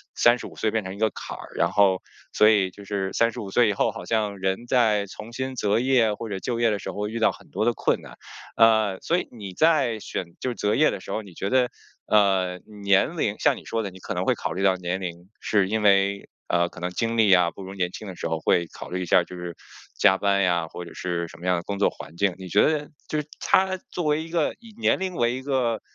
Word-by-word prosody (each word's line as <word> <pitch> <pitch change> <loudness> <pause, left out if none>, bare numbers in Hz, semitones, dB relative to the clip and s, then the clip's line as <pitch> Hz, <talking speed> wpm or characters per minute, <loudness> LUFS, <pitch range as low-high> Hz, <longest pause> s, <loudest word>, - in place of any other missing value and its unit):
三 120 +1 +5
十 - - -7
五 - - -13
岁 110 - 0
变 110 -1 0
成 95 0 -6
一 - - -11
个 110 +1 +2
坎 - - -7
儿。 - - -9
然 - - +1
后 95 -2 +3 0.3
所 105 - +6
以 100 -4 +3
就 100 - -13
是 95 -1 -2
三 115 0 +3
十 - - -8
五 100 - -6
岁 120 +1 +4
以 105 - +1
后 - - +1
好 115 - -8
像 105 -3 -1
人 95 +4 -1
在 110 -5 +3
重 105 +3 -10
新 130 +1 -4
择 105 -1 +1
业 120 -3 +3
或 115 +2 -6
者 100 -3 -4
就 115 +4 -3
业 120 -1 +3
的 105 - -1
时 - - -5
候 105 +1 -3
遇 115 +2 -4
到 110 - +4
很 - - -16
多 - - -2
的 - - +3
困 - - 0
难。 - - -13 0.4
呃， 110 -4 +4
所 170 - +1
以 - - -5
你 100 -6 -8
在 140 - +3
选 95 - -4 0.2
就 130 - -1
是 120 - -4
择 105 0 0
业 155 - +4
的 - - -5
时 - - -9
候， 110 - -2
你 100 -4 -13
觉 95 +4 -3
得， 125 -1 +3 0.4
呃， 95 -3 +3 0.2
年 100 -1 +3
龄 - - -1
像 - - +3
你 - - -11
说 115 -1 -2
的， 100 - -3
你 95 - -13
可 - - -5
能 - - -1
会 - - +3
考 - - -4
虑 95 +4 -3
到 95 -1 +4
年 90 +1 -3
龄， 85 0 -7
是 100 -3 +1
因 110 +1 0
为 100 0 +3 0.2
呃 85 0 +2
可 - - -12
能 90 +1 -2
精 115 +5 -2
力 105 -3 +5
啊， 90 -2 +4
不 100 - -10
如 95 +1 -8
年 90 -2 -1
轻 105 - -8
的 95 - -7
时 - - -4
候 80 -1 -2
会 85 +2 +2
考 - - -9
虑 90 +1 -3
一 - - -4
下， 85 - +4
就 90 - -10
是 90 -1 -6 0.4
加 95 +1 +5
班 100 -1 +2
呀， 85 -3 +1
或 90 - -8
者 85 - -11
是 85 -1 -3
什 - - -14
么 85 - -9
样 90 -1 +3
的 85 - -4
工 100 +2 -4
作 100 - +4
环 80 - -11
境。 100 -1 +2
你 95 - -8
觉 100 - +4
得 150 -1 +1 0.2
就 155 - -1
是 150 - -14
它 190 0 +2
作 175 - -3
为 150 +1 +1
一 165 - -10
个 165 -2 0
以 230 -2 -15
年 225 - +2
龄 185 -1 -3
为 120 -2 +1
一 130 - -5
个， 125 -5 0
100 Hz, 300 characters per minute, -25 LUFS, 95-115 Hz, 0.4 s, 所